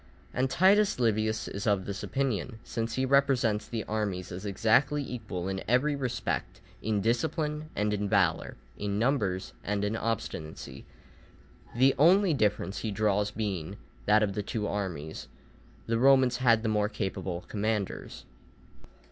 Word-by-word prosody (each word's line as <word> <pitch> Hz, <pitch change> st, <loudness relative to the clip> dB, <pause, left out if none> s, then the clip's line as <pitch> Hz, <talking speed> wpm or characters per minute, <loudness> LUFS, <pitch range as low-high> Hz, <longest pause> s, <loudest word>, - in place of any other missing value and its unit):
And 130 Hz, +1 st, +1 dB
Titus 195 Hz, +3 st, +4 dB
Livius 110 Hz, -2 st, +1 dB
is 100 Hz, +3 st, -5 dB
of 100 Hz, -3 st, +2 dB
this 100 Hz, -1 st, -5 dB
opinion, 125 Hz, -4 st, -2 dB
since 115 Hz, 0 st, -3 dB
he 130 Hz, -, +1 dB
represents 130 Hz, -6 st, +2 dB
the 115 Hz, -2 st, -3 dB
armies 100 Hz, -5 st, -3 dB
as 95 Hz, +3 st, -6 dB
exactly 115 Hz, +8 st, +2 dB
equal 105 Hz, -9 st, -5 dB
in 95 Hz, 0 st, -3 dB
every 130 Hz, +5 st, +2 dB
respect, 130 Hz, -3 st, -3 dB, 0.2 s
in 105 Hz, -1 st, 0 dB
discipline 150 Hz, -, -1 dB
and 105 Hz, 0 st, 0 dB
in 105 Hz, -1 st, -1 dB
valour, -, -, +1 dB, 0.2 s
in 100 Hz, 0 st, -2 dB
numbers 105 Hz, -6 st, 0 dB
and 105 Hz, 0 st, -1 dB
in 105 Hz, +2 st, -1 dB
obstinacy, 80 Hz, -, -4 dB, 0.9 s
the 130 Hz, +2 st, +5 dB
only 180 Hz, +3 st, +5 dB
difference 105 Hz, -5 st, 0 dB
he 110 Hz, -, -3 dB
draws 105 Hz, 0 st, +1 dB
being, 100 Hz, -4 st, -4 dB, 0.3 s
that 105 Hz, +1 st, +5 dB
of 100 Hz, -2 st, 0 dB
the 105 Hz, -, -2 dB
two 105 Hz, +1 st, -3 dB
armies 90 Hz, -8 st, -4 dB, 0.6 s
the 115 Hz, 0 st, 0 dB
Romans 130 Hz, -1 st, +5 dB
had 115 Hz, -3 st, +3 dB
the -, -, 0 dB
more 105 Hz, -1 st, +1 dB
capable 95 Hz, -4 st, -3 dB
commanders. 105 Hz, -1 st, -3 dB
110 Hz, 145 wpm, -29 LUFS, 100-130 Hz, 0.9 s, the